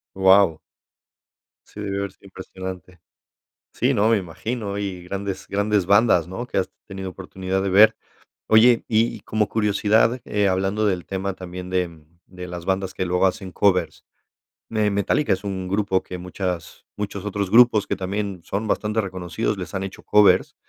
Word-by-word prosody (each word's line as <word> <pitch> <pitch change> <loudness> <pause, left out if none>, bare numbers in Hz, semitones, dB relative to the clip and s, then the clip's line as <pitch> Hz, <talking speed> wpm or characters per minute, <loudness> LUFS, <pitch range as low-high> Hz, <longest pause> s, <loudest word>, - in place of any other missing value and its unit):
¡Guau! 95 -3 +5 1.1
Sí 105 - -11
debió 100 -1 -3
haber 100 -1 -4
sido 100 - -20
impresionante. 95 -2 -9 0.7
Sí, 130 +4 +1
no, 110 +1 +3
me 115 - +4
imagino, 100 +4 -4
y 95 -3 -4
grandes 100 0 -5
grandes 100 -2 +1
bandas, 100 -5 +4
¿no? 120 +7 -5
Que 100 - -2
has 95 - -1 0.2
tenido 95 -2 -6
oportunidad 95 0 -4
de 100 - -1
ver. 105 +3 +6 0.5
Oye, 115 +2 +5
y 115 +1 +2
y - - -12
como 105 -2 -1
curiosidad, 110 +3 +2
eh, 105 -1 +1
hablando 95 +3 0
del 90 -3 -1
tema 95 0 -3
también 90 0 -8
de 85 -4 -2 0.2
de 90 -1 -9
las 85 -1 -7
bandas 95 0 -1
que 95 - -2
luego 90 +2 +2
hacen 95 -1 -3
covers, 90 -6 +1 0.7
eh, 110 -2 +1
Metallica 100 +4 +1
es 95 - -1
un 95 -2 -4
grupo 100 -1 0
que 90 - -8
muchas 90 -1 -5
muchos 105 -1 -5
otros 100 -2 -2
grupos 115 -2 +6
que - - -2
también 95 -1 -4
son 105 +4 -3
bastante 105 +2 0
reconocidos, 95 +2 -3
les 95 +1 -7
han 95 - -2
hecho 95 0 -7
covers, 100 -3 +4
95 Hz, 170 wpm, -23 LUFS, 95-105 Hz, 1.1 s, ver